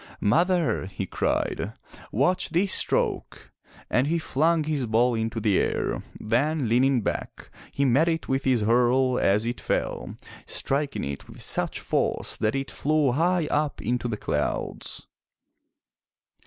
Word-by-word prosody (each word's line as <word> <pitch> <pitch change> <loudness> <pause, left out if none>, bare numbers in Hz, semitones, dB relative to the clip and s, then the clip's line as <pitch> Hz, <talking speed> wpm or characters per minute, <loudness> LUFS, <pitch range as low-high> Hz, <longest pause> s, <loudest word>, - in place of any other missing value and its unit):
"Mother," 170 - +2
he 95 0 -5
cried, - - -1 0.4
"watch 180 - +1
this 180 +4 +1
stroke!" - - -1 0.4
And 125 +3 +1
he 170 +2 +1
flung 160 +1 +1
his 150 -5 -1
ball 120 +3 +3
into 115 0 -2
the 105 -3 +2
air, - - -1 0.2
then, 135 +5 0
leaning 125 +2 +3
back, - - -5 0.2
he 140 - 0
met 135 +6 +3
it 165 -1 -1
with 135 +1 0
his 130 -4 +2
hurle 125 +3 +3
as 105 +3 +2
it 120 +1 -3
fell, - - -2 0.3
striking 140 +1 -1
it 70 0 -5
with - - -10
such - - 0
force - - -1
that 110 +3 0
it 135 0 -3
flew 150 -2 +1
high 170 +5 +1
up 150 0 0
into 120 +3 -1
the 110 -3 -3
clouds. 75 -7 -3
130 Hz, 140 wpm, -25 LUFS, 115-155 Hz, 0.4 s, ball